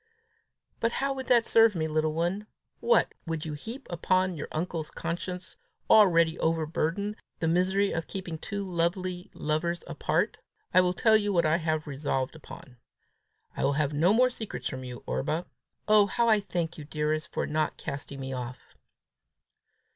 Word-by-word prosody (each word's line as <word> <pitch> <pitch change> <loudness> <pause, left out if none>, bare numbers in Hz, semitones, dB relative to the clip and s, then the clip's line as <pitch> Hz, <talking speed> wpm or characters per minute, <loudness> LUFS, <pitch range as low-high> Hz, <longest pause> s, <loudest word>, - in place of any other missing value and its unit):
"But 230 0 +1
how 275 0 0
would 265 -1 -6
that 240 -2 +5
serve 225 -2 +5
me, 160 -2 0
little 155 0 0
one? 175 +6 -1 0.3
What! 480 - +3
would 165 -1 -3
you 155 - -4
heap 230 - -8 0.2
on 185 -1 +3
your 150 - -5
uncle's 160 -1 -3
conscience, 180 +2 -5 0.4
already 170 -6 +6
overburdened, 165 +5 0 0.2
the 165 - -1
misery 190 +4 +2
of 165 0 -3
keeping 175 -4 -5
two 205 +5 -4
lovely 180 +1 -2
lovers 160 +3 -1
apart? 170 +4 -1 0.3
I 185 - +7
will 180 0 +1
tell 220 +3 +5
you 205 -1 +2
what 175 -4 +3
I 155 +1 +3
have 155 -2 -1
resolved 140 -1 -2
upon. 135 -4 -12 0.8
I - - -2
will 140 - +3
have 145 0 0
no 165 +6 +4
more 250 +3 +4
secrets 220 -3 -5
from 130 -1 -5
you, 125 -1 -8
Orba. 155 - -1 0.4
Oh, 210 -1 +6
how 235 +4 +1
I 215 -2 +5
thank 170 -5 -3
you, - - -6
dearest, 155 +1 -2
for - - -1
not 155 0 -1
casting 140 0 -6
me 130 0 -4
off!" 125 -1 -7
170 Hz, 165 wpm, -28 LUFS, 155-200 Hz, 0.8 s, I